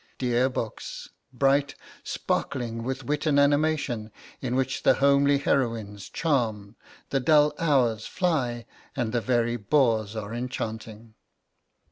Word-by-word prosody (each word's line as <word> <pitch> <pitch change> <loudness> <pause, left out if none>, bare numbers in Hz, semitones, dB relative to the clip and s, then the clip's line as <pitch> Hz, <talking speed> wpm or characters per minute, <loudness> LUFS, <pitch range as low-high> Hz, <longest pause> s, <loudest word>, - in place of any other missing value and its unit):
Dear 125 0 +1
books! 115 -4 -6 0.2
bright, 140 +2 +2 0.3
sparkling 115 -2 -2
with 130 +3 -4
wit 150 +5 -2
and 145 -2 +4
animation, 145 -6 +1 0.3
in 125 -1 -2
which 130 0 -1
the - - +4
homely 140 +1 +4
heroines 115 -8 -1
charm, 115 -9 -1 0.4
the 135 - +2
dull 150 +1 +4
hours 125 -9 +2
fly, 130 -10 -1 0.3
and 115 -2 -1
the 120 - +1
very 120 -1 +1
bores 110 -2 +1
are 110 0 -5
enchanting. 110 -2 -5
125 Hz, 120 wpm, -26 LUFS, 115-140 Hz, 0.4 s, and